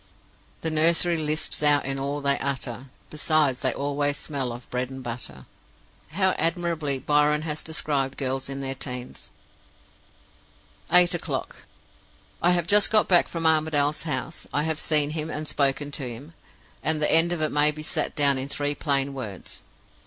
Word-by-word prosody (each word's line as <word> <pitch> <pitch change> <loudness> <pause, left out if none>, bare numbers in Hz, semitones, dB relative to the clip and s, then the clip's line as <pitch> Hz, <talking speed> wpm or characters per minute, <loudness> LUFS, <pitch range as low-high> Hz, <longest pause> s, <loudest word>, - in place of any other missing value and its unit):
"'The 160 - -1
nursery 170 +2 +4
lisps 155 -1 -1
out 145 -1 +5
in 135 0 -2
all 140 +2 -3
they 140 0 +1
utter; 130 -2 -4 0.3
Besides, 150 -4 +1
they - - +2
always 145 0 -2
smell 135 -5 -4
of 120 +1 -10
bread 125 0 -2
and 130 -1 -9
butter.' 120 0 -7 0.7
"How 190 +1 +2
admirably 165 -4 -1
Byron 150 +2 +1
has 155 -1 -3
described 140 -4 -2
girls 135 0 -2
in 135 0 -5
their 135 0 -2
teens!" 125 -2 -6 1.6
"Eight 180 0 +6
o'clock. 175 - -4 0.7
I 175 - +3
have 175 -2 0
just 205 +4 +6
got 215 -1 +4
back 175 -2 +4
from 165 -1 -4
Armadale's 155 -2 +2
house. 150 0 -4
I 145 - 0
have 160 -1 -2
seen 150 -2 +4
him, 155 0 -3
and 155 0 -4
spoken 145 0 0
to 135 -3 -3
him; 135 +8 -10 0.5
and 160 0 0
the 150 - +1
end 165 +2 +4
of 175 - -2
it 155 0 0
may 150 +1 +3
be 155 0 -5
set 155 - -1
down 140 -2 +3
in 130 - -3
three 145 0 -1
plain 140 -2 0
words. 110 -8 -7
145 Hz, 165 wpm, -25 LUFS, 135-160 Hz, 1.6 s, Eight